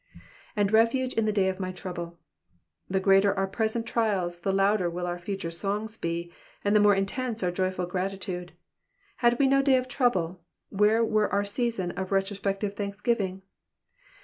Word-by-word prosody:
^^And 205 -1 +2
refuge 230 +4 +3
in 225 - +1
the 215 - +2
day 195 -2 +2
of 190 0 -2
my 185 -1 -3
trouble.'''' 175 -2 -6 0.7
The 190 - +1
greater 195 +1 +4
our 195 0 +1
present 220 +3 -1
trials 195 -7 0
the 195 +3 -1
louder 195 -1 +2
will 175 +1 -4
our 175 0 -3
future 190 -1 -4
songs 205 +5 -3
be, 170 -3 -4 0.3
and 205 +1 +3
the - - +7
more 205 -1 +5
intense 225 +3 -2
our 180 - +1
joyful 185 0 -1
gratitude. 185 0 -4 0.6
Had 240 -1 +3
we 275 - +3
no 275 +1 +4
day 275 -1 +4
of 255 0 -2
trouble, 190 -10 0 0.3
where 210 +3 +3
were 215 -1 +1
our 200 0 +1
season 200 -4 -1
of 190 +1 -5
retrospective 195 +1 -1
thanksgiving 200 -1 -2
195 Hz, 170 wpm, -27 LUFS, 185-220 Hz, 0.7 s, the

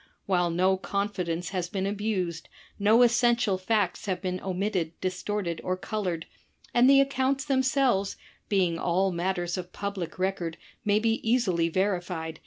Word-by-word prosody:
While 180 -3 +2
no 185 +3 +2
confidence 180 -4 -2
has 180 -3 -3
been 195 -1 -2
abused, 195 -5 -2 0.3
no 220 +4 +5
essential 235 -4 +3
facts 205 0 0
have 185 -2 -1
been 185 -1 -3
omitted, 185 -3 -2
distorted, 185 -1 -2
or 185 0 -1
colored, 185 -5 -3 0.5
and 245 +2 +6
the 275 0 +7
accounts 275 0 +1
themselves, 260 -7 +1 0.3
being 180 -5 +2
all 185 +2 +1
matters 175 0 -1
of 180 0 -7
public 200 -5 -5
record, 185 -3 -2 0.3
may 205 0 +3
be 225 +1 +1
easily 195 -8 +2
verified. 175 -3 -2
190 Hz, 140 wpm, -27 LUFS, 175-215 Hz, 0.5 s, the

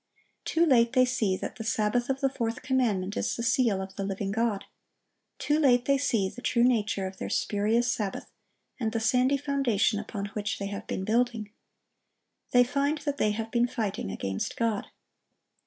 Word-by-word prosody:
Too 330 +1 +2
late 240 -5 +4
they 255 -1 +5
see 215 -7 0
that - - -6
the 225 - -5
Sabbath 225 +2 0
of 270 0 -1
the 270 - +3
fourth 230 -3 -3
commandment 215 -7 0
is - - -1
the 235 - -4
seal 230 -4 +2
of 190 0 -11
the 200 - -2
living 195 0 -3
God. 220 -1 0 0.7
Too 300 +1 +1
late 250 -5 +4
they 275 -1 +3
see 225 -8 +1
the 245 - -9
true 235 -1 +2
nature 215 -5 +1
of 190 0 -6
their - - -5
spurious 230 0 +1
sabbath, 205 -3 -4 0.5
and 220 -3 -1
the 225 - 0
sandy 250 +5 +2
foundation 270 -7 +1
upon 210 -1 -5
which 205 0 -2
they 200 - -4
have 200 - -6
been 190 - -3
building. 230 -1 0 1.0
They 245 0 +6
find 280 +4 0
that 285 -1 -1
they 215 - +2
have 220 +2 -3
been 240 0 +2
fighting 205 - -3
against 95 0 -3
God. 225 -3 0
230 Hz, 185 wpm, -28 LUFS, 205-255 Hz, 1.0 s, They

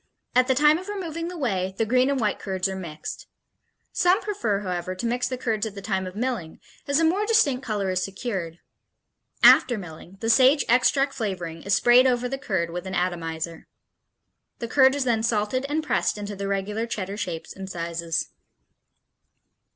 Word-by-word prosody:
At 255 0 +4
the 260 - +2
time 300 +4 +5
of 375 - -10
removing 335 -5 -4
the 355 0 -6
whey 190 - -1
the 225 - +1
green 255 +4 +3
and 280 -1 0
white 210 -3 0
curds 190 -1 -2
are 190 - -4
mixed. 155 -5 -7 0.6
Some 360 +2 +3
prefer, 235 - -2
however, 185 -1 -3
to 210 - -5
mix 245 +2 0
the 255 - -3
curds 220 -3 -1
at 210 - -9
the 200 - -7
time 190 -3 -1
of 185 - -9
milling, 225 -8 -3 0.3
as 280 +2 +2
a - - +2
more 360 +6 +2
distinct 285 - +3
color 210 -4 -2
is 185 0 0
secured. 190 -4 -4 0.9
After 250 -3 +7
milling, 175 0 -10
the 225 - -3
sage 260 +5 +5
extract 270 +3 +3
flavoring 180 -9 -4
is 200 0 +1
sprayed 240 +5 +6
over 250 -1 +1
the 270 +2 -4
curd 185 -10 -2
with 180 +2 -5
an 190 - -4
atomizer. 165 -2 -3 0.9
The 235 - -5
curd 265 +2 +5
is 285 - 0
then 235 -3 +1
salted 225 +4 0
and 310 +2 -1
pressed 300 - 0
into 205 0 -5
the 200 0 -4
regular 205 +3 -2
Cheddar 200 -3 -4
shapes 170 -6 -5
and 190 0 -7
sizes. 170 -2 -3
215 Hz, 185 wpm, -25 LUFS, 185-260 Hz, 0.9 s, After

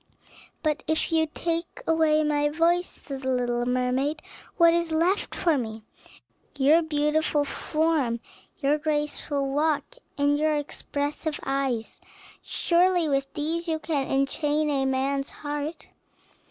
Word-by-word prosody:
"But 305 -1 0
if 315 +1 0
you 320 -1 +3
take 335 +1 -3
away 315 -1 +3
my 295 -1 +2
voice," 340 +3 +2
said 275 -2 -8
the 260 - -2
little 245 -1 0
mermaid, 255 +5 0 0.3
"what 335 -2 +6
is 340 -1 0
left 340 +5 +1
for 325 -5 +2
me?" 220 -2 -5 0.7
"Your 290 +5 +5
beautiful 300 -1 +1
form, 305 -6 0 0.4
your 295 0 +1
graceful 295 -2 -1
walk, 310 - 0 0.2
and 290 0 +2
your 310 0 +2
expressive 290 +1 -3
eyes; 270 -4 -2 0.4
surely 350 -1 +2
with 275 -1 0
these 330 +3 -2
you 320 -1 0
can 305 -4 -1
enchain 295 +2 +1
a 270 -2 +1
man's 270 +1 0
heart. 295 +2 -5
295 Hz, 125 wpm, -26 LUFS, 275-320 Hz, 0.7 s, what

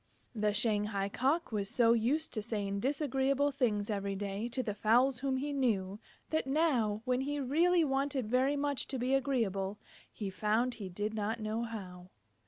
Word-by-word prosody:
The 210 -2 +1
Shanghai 210 -2 +1
Cock 275 +10 0
was 200 -2 -1
so 235 0 +4
used 265 +8 0
to 215 - -1
saying 200 -2 -2
disagreeable 275 +2 +1
things 220 -6 0
every 200 -1 -2
day 200 +3 -3
to 255 +2 -2
the 215 -3 -2
fowls 240 +5 +3
whom 265 0 0
he 285 +2 -2
knew, 210 -7 0 0.3
that 315 -3 0
now, 255 -8 +1
when 250 0 +1
he 290 +2 -2
really 330 +6 +3
wanted 275 -2 0
very 260 +5 +2
much 285 -1 -1
to 265 - -3
be 250 +2 0
agreeable, 215 -8 0 0.3
he 200 -3 -5
found 220 +5 +1
he 200 -5 -7
did 205 +4 -3
not 220 +2 -2
know 215 +1 -2
how. 185 -6 -7
235 Hz, 175 wpm, -32 LUFS, 210-270 Hz, 0.3 s, so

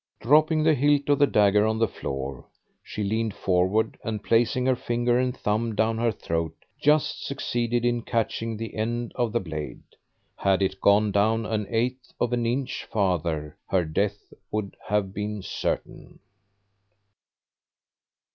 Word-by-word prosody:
Dropping 155 +5 +4
the 160 0 +5
hilt 145 0 +2
of 145 - +4
the 145 - +6
dagger 105 -1 +4
on 110 0 0
the 115 0 +2
floor, 70 -7 -5 0.4
she 105 - -5
leaned 110 +1 -1
forward, 95 +4 +1
and 110 -2 -3
placing 120 +3 +2
her 130 -1 +3
finger 120 0 0
and 125 0 -1
thumb 110 +2 -1
down 110 +1 +1
her 115 0 +2
throat, 85 -5 -3 0.3
just 150 0 +2
succeeded 120 -3 -1
in 120 -1 +1
catching 115 -1 -2
the 115 -1 -6
end 120 +2 -2
of 120 -3 0
the 120 - +1
blade. 80 -6 -6 0.5
Had 95 0 +2
it 95 0 -2
gone 105 +1 +4
down 110 +3 +2
an 105 -2 -2
eighth 125 +2 -2
of 120 - 0
an 120 -1 +1
inch 125 +2 -2
farther 85 -7 -1
her 90 -3 +2
death 100 +6 -2 0.2
would 105 -2 -3
have 105 -2 0
been 105 0 -4
certain. - - -4
110 Hz, 150 wpm, -26 LUFS, 100-120 Hz, 0.5 s, the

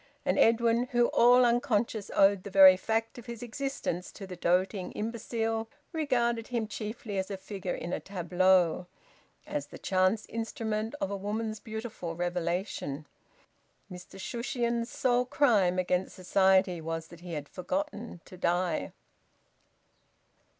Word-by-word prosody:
And - - +1
Edwin, 230 +1 +4
who, 240 0 +4
all 245 +1 +6
unconscious, 235 -3 +1
owed 195 -1 +5
the 200 - -8
very 190 -1 +9
fact 225 +5 -2
of 240 - -13
his 235 -1 -7
existence 245 -8 -4
to 200 - -8
the 185 -1 -8
doting 180 +2 0
imbecile, 225 0 -2 0.2
regarded 240 -7 0
him 235 -3 -1
chiefly 210 -1 -5
as 190 - -3
a 195 - -4
figure 190 -1 -5
in 175 - -5
a - - -1
tableau, 180 -1 +2 0.6
as 145 -1 -4
the - - -11
chance 185 +3 +1
instrument 225 0 -3
of 200 - -2
a - - -1
woman's 215 +2 -3
beautiful 220 -7 -6
revelation. 175 -4 -2 0.9
Mr 180 +1 -10
Shushions's 235 +1 -2
sole 250 -3 +1
crime 215 -10 +3
against 180 0 0
society 190 -1 +3
was 165 0 -4
that 170 - -13
he 175 0 -8
had 145 -2 -4
forgotten 230 - -4
to 185 - -12
die. 175 0 0
205 Hz, 135 wpm, -29 LUFS, 180-235 Hz, 0.9 s, very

